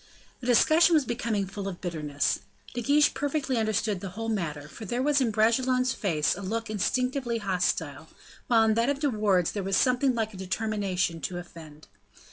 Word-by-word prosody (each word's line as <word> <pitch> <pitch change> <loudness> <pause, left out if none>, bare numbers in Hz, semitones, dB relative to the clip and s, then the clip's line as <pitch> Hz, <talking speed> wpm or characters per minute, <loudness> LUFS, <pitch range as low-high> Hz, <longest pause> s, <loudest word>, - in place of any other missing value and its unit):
The 250 - -7
discussion 315 +8 +5
was 300 -4 +3
becoming 230 -4 -1
full 195 +1 -6
of 185 -3 -6
bitterness. 150 -5 -1 0.3
De 245 - -3
Guiche 290 +5 +3
perfectly 285 -3 -1
understood 215 -2 0
the 195 0 -6
whole 225 +5 -5
matter, 155 -9 -3
for 220 - -11
there 240 +5 -2
was 290 -1 +3
in 245 - +2
Bragelonne's 255 +4 +2
face 155 -7 0
a 190 - -8
look 225 +3 -3
instinctively 250 +3 -1
hostile, 175 -7 -1 0.4
while 230 -2 +4
in 220 -1 +3
that 230 +4 +1
of 285 - 0
De 290 -2 +1
Wardes 200 -6 +2
there 205 - -3
was 195 0 0
something 255 0 +2
like 220 -1 -2
a - - -9
determination 190 -3 -2
to 175 +5 -4
offend. 160 -3 -11
215 Hz, 185 wpm, -27 LUFS, 185-250 Hz, 0.4 s, discussion